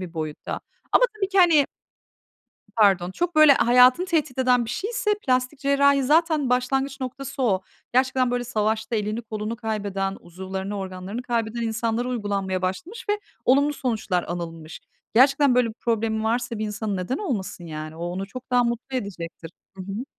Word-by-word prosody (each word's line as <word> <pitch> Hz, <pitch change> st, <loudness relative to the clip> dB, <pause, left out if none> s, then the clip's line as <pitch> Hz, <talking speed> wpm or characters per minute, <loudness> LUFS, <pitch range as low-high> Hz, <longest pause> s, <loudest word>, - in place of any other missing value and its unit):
bir 180 Hz, -2 st, -7 dB
boyutta. 155 Hz, -2 st, -4 dB, 0.3 s
Ama -, -, +6 dB
tabii 390 Hz, -2 st, -1 dB
ki, 390 Hz, 0 st, 0 dB
hani 325 Hz, -6 st, +6 dB, 1.1 s
pardon, 195 Hz, -5 st, +4 dB
çok 345 Hz, -, -2 dB
böyle 310 Hz, -2 st, +9 dB
hayatını 250 Hz, +7 st, +5 dB
tehdit 305 Hz, -7 st, -1 dB
eden 250 Hz, -2 st, +3 dB
bir 225 Hz, -, -5 dB
şeyse, 420 Hz, -, -1 dB
plastik 255 Hz, +2 st, +1 dB
cerrahi 280 Hz, 0 st, +3 dB
zaten 305 Hz, -1 st, +2 dB
başlangıç 270 Hz, +2 st, 0 dB
noktası 260 Hz, +1 st, -5 dB
o. 195 Hz, -6 st, +2 dB, 0.3 s
Gerçekten 255 Hz, -1 st, +2 dB
böyle 245 Hz, 0 st, -1 dB
savaşta 220 Hz, -1 st, -1 dB
elini 215 Hz, +2 st, -2 dB
kolunu 220 Hz, 0 st, -4 dB
kaybeden, 200 Hz, -4 st, -2 dB
uzuvlarını 190 Hz, +3 st, -6 dB
organlarını 190 Hz, +4 st, -5 dB
kaybeden 235 Hz, -1 st, -2 dB
insanlara 230 Hz, +2 st, -1 dB
uygulanmaya 200 Hz, -6 st, -2 dB
başlamış 325 Hz, -, -4 dB
ve 415 Hz, 0 st, +1 dB, 0.2 s
olumlu 285 Hz, +3 st, +4 dB
sonuçlar 220 Hz, -9 st, -1 dB
anılmış. 165 Hz, -2 st, -6 dB, 0.3 s
Gerçekten 275 Hz, +2 st, +5 dB
böyle 245 Hz, -2 st, +3 dB
bir 220 Hz, -, -7 dB
problemi 220 Hz, -2 st, -1 dB
varsa 235 Hz, 0 st, -1 dB
bir 215 Hz, -, -2 dB
insanın 210 Hz, -1 st, -3 dB
neden 185 Hz, +10 st, -2 dB
olmasın 205 Hz, -, -4 dB
yani? 155 Hz, -1 st, -7 dB
O 170 Hz, -, -5 dB
onu 180 Hz, +3 st, -4 dB
çok 255 Hz, +5 st, -10 dB
daha 245 Hz, 0 st, +4 dB
mutlu 240 Hz, +2 st, -3 dB
edecektir. 170 Hz, -7 st, -6 dB, 0.3 s
Hı 190 Hz, -, -6 dB
hı. 200 Hz, +6 st, -5 dB
235 Hz, 160 wpm, -24 LUFS, 195-265 Hz, 1.1 s, böyle